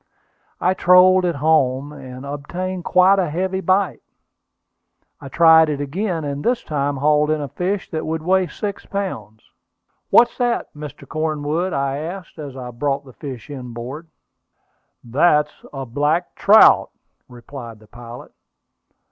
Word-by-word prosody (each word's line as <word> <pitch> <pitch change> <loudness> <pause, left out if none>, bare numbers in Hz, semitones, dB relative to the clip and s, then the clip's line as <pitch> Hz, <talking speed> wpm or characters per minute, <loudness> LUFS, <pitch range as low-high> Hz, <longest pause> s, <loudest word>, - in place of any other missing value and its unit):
I 185 - +2
trolled 185 0 +5
it 170 -2 0
home, 145 -2 +1
and 130 -2 -10
obtained 175 +6 -5
quite 190 +2 +4
a 180 -4 0
heavy 190 +4 -2
bite. 190 0 +1 1.2
I 135 - -10
tried 160 +1 +6
it 145 -2 -2
again, 165 +4 -3
and 145 0 -4
this 240 0 0
time 145 -2 -2
hauled 150 +2 +2
in 155 0 +1
a 145 - -4
fish 185 +8 -3
that 160 - -3
would 160 0 -3
weigh 185 +1 +2
six 200 +4 -5
pounds. 125 - -5 0.7
"What's 240 - +5
that, 240 -1 -1
Mr. 150 -2 -10
Cornwood?" 155 +3 -2
I 140 -2 -1
asked, 175 +2 -8
as 140 -3 -8
I 125 -1 -7
brought 140 +3 -2
the 130 - -14
fish 135 -1 -9
inboard. 125 +4 -8 1.0
"That's 150 +4 +2 0.2
a 135 -2 -6
black 145 +8 -1
trout," 215 +2 +6 0.4
replied 120 -1 -10
the 110 - -19
pilot. 120 +2 -12
150 Hz, 140 wpm, -20 LUFS, 135-180 Hz, 1.2 s, tried